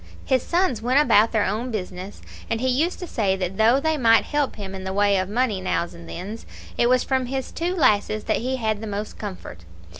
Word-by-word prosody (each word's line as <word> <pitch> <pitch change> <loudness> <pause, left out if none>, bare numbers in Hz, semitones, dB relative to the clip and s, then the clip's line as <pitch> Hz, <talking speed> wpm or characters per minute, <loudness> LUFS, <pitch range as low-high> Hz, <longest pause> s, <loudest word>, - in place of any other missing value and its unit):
His 260 -2 +2
sons 345 - 0
went 255 +4 +3
about 225 -6 +4
their 215 -3 +2
own 220 +6 -2
business; 190 -2 -6 0.3
and 225 - -1
he 260 - -1
used 295 +8 +1
to - - -3
say 200 - 0
that 190 0 -4
though 230 +5 +4
they 315 +2 0
might 230 -4 +5
help 290 -2 -1
him 195 -2 -7
in 190 -1 -6
the 190 0 -4
way 205 0 +3
of 185 0 -1
money 220 -3 0
nows 175 -2 -1
and 85 0 -12
thens, 205 - -7 0.3
it 240 - +2
was 255 0 +3
from 260 -2 0
his 265 0 -4
two 350 +2 -2
lasses 215 - +2
that - - 0
he 255 +3 -2
had 220 -4 -1
the 220 - -5
most 205 +1 -5
comfort. 185 - -8
220 Hz, 230 wpm, -23 LUFS, 200-260 Hz, 0.3 s, might